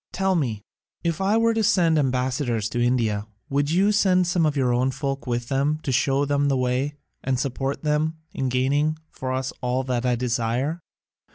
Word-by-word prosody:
Tell 190 0 +1
me, 120 - -1 0.4
if 170 +1 -1
I 200 +3 +3
were 230 0 +3
to 225 0 0
send 170 -6 +3
ambassadors 125 -4 0
to 120 0 0
India, 110 -4 +1 0.2
would 145 +1 +1
you 190 +6 +3
send 185 -3 +3
some 175 -2 +2
of 150 -1 -1
your 125 -3 +2
own 125 +2 +2
folk 135 0 -4
with 120 -1 -2
them 140 +3 +1
to 135 - -1
show 135 +2 +2
them 145 0 +1
the 135 -1 +2
way, 130 +3 0 0.3
and 130 -1 0
support 135 +2 -2
them 155 +1 +1 0.2
in 135 -1 -1
gaining 140 +5 +1
for 130 0 -4
us 130 0 -2
all 125 +1 0
that 125 -2 -1
I 125 -1 +2
desire? 125 +6 -1
135 Hz, 190 wpm, -24 LUFS, 125-155 Hz, 0.4 s, I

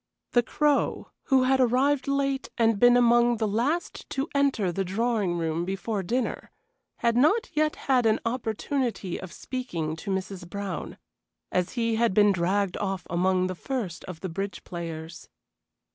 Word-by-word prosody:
The 240 - +5
Crow, 290 +4 0
who 265 -2 +4
had 265 +1 +3
arrived 260 +3 +2
late 275 -1 0
and 225 -3 +3
been 245 +1 +7
among 240 0 +4
the 220 0 0
last 250 +12 -1
to 270 +2 -2
enter 275 -10 +2
the 195 +3 -1
drawing 200 -2 0
room 165 0 -1
before 195 +3 -2
dinner, 240 +7 -2 0.5
had 235 -1 +1
not 310 - +3
yet 305 0 +2
had 255 -4 +3
an 220 - +3
opportunity 230 -3 -2
of 185 -2 -8
speaking 170 -14 -4
to 160 - -7
Mrs. 190 -2 -4
Brown, 200 -2 -5 0.5
as 180 -1 0
he 230 -2 0
had 230 -4 +2
been 205 -1 +6
dragged 190 +1 0
off 195 -2 -3
among 185 +1 +2
the 185 - -2
first 205 -4 -4
of 180 -3 -8
the 190 - -3
bridge 195 +4 -4
players. 165 -2 -7
220 Hz, 160 wpm, -27 LUFS, 185-255 Hz, 0.5 s, been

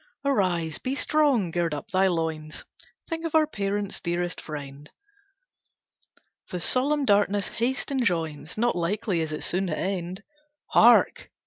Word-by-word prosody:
"Arise! 180 - 0
Be 260 +1 -2
strong! 280 - +2
Gird 170 -2 0
up 145 - -8
thy 190 0 +3
loins! 160 -3 -3 0.4
Think 330 -1 -4
of 330 -1 -3
our 315 -1 +6
parents, 200 -6 -3
dearest 175 0 -2
friend! 145 -1 -8 1.6
The 180 - -4
solemn 280 - +1
darkness 205 -2 +2
haste 255 +4 -1
enjoins, 170 - -1
Not 240 0 +1
likely 180 +1 -1
is 160 -1 -3
it 150 - -4
soon 190 +2 -1
to 155 - -2
end. 185 +1 -3 0.5
Hark! - - +5
190 Hz, 135 wpm, -26 LUFS, 165-240 Hz, 1.6 s, our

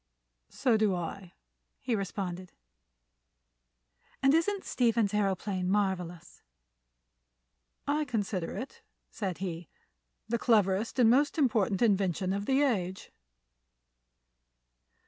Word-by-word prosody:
"So 235 -4 +2
do 215 -3 +2
I," 175 +1 -6 0.5
he 245 - -1
responded. 185 -3 -4 1.7
"And 270 +1 +5
isn't 380 +5 +1
Stephen's 230 -4 +1
aëroplane 195 -2 -1
marvelous?" 185 -4 -2 1.4
"I 300 +1 0
consider 205 -8 -2
it," 260 - -7 0.3
said 190 -5 -3
he, 170 -3 -5 0.6
"the 235 +1 -1
cleverest 210 -2 +2
and 235 -3 +6
most 285 +6 +2
important 225 -8 +2
invention 195 -3 +1
of 200 +1 -3
the 270 +2 +3
age." 190 -8 -1
205 Hz, 95 wpm, -30 LUFS, 185-240 Hz, 1.7 s, and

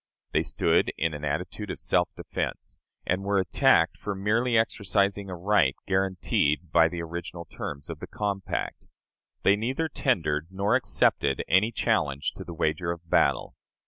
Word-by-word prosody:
They - - +2
stood - - +1
in 80 -1 0
an 75 0 -7
attitude 90 +7 -3
of - - -5
self - - +1
defense, - - -5 0.3
and 95 +2 0
were 100 0 +1
attacked 95 -3 +3
for 105 - -4
merely 115 +5 +1
exercising 100 -2 +1
a 90 - -4
right 90 -6 +2
guaranteed 90 -4 0
by 85 -1 +6
the 85 0 -5
original 85 +1 -6
terms 70 -2 -7
of - - -7
the - - -7
compact. 100 -2 -3 0.6
They 100 - +5
neither 130 +10 -1
tendered 80 - 0
nor 100 +2 0
accepted 70 -2 +1
any 100 +6 +3
challenge 70 -9 0
to 95 - -6
the 85 -1 -8
wager 80 +2 0
of 85 0 -8
battle. - - +2
95 Hz, 155 wpm, -27 LUFS, 80-100 Hz, 0.6 s, by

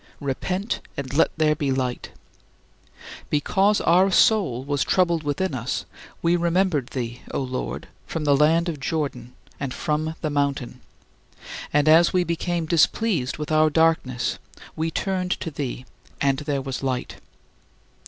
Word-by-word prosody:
" - - -31
Repent, 180 - -2 0.2
and 140 -1 -4
let 155 - +4
there 155 -1 +3
be 140 -2 -1
light. 130 -2 -2 1.2
Because 195 +8 +2
our 185 +3 +4
soul 190 - +3
was 145 0 0
troubled 170 -3 +2
within 145 +4 -1
us, 125 0 -3 0.4
we 170 +1 +3
remembered 170 -5 +1
thee, 120 -2 -5
O - - -1
Lord, 130 -1 -4 0.2
from 160 - -3
the 145 -1 +4
land 160 +4 +3
of 160 -4 -3
Jordan, 135 -4 -3 0.2
and 140 -2 -4
from 155 +1 -1
the 155 - -1
mountain 140 -3 -1 0.9
and 145 +1 +2
as 165 +2 +6
we 180 -1 +3
became 170 0 -2
displeased 165 - +1
with 150 +1 -5
our 155 0 +4
darkness 150 -6 +1 0.4
we 160 +1 -1
turned 185 +1 -1
to 165 - -4
thee, 130 -3 -5 0.3
"and 135 -1 +2
there 145 -2 -2
was 135 -1 -4
light." 130 -2 -3
150 Hz, 145 wpm, -24 LUFS, 135-170 Hz, 1.2 s, as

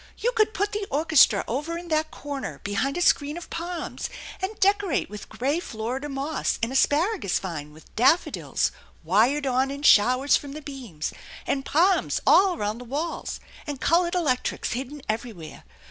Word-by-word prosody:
" - - -32
You 485 - +3
could 435 -2 +1
put 405 +1 0
the 415 -1 -3
orchestra 290 -8 +4
over 295 +8 -2
in 345 0 -8
that 310 0 +1
corner 285 -3 -6
behind 210 - -1
a 355 - +1
screen 295 0 +2
of 345 - -9
palms, 340 0 -4 0.3
and 390 +3 -4
decorate 400 - +2
with 210 -1 -8
gray 280 +7 -1
Florida 255 0 -4
moss 280 +3 -2
and 230 - +1
asparagus 295 - +2
vine 155 -6 -5
with 155 +1 -18
daffodils 255 +10 +2 0.3
wired 230 - +3
on 260 +1 +1
in 280 +1 -6
showers 255 +3 +5
from 280 -1 -3
the 305 - -7
beams, 245 - -6 0.3
and 270 -1 -1
palms 360 +5 +3
all 375 -2 +5
around 210 +2 -2
the - - -8
walla, 290 +7 -3 0.4
and 290 -3 -4
colored 345 +3 +2
electrics 290 -8 0
hidden 265 +3 -5
everywhere. 215 -7 -5
285 Hz, 165 wpm, -25 LUFS, 240-340 Hz, 0.4 s, showers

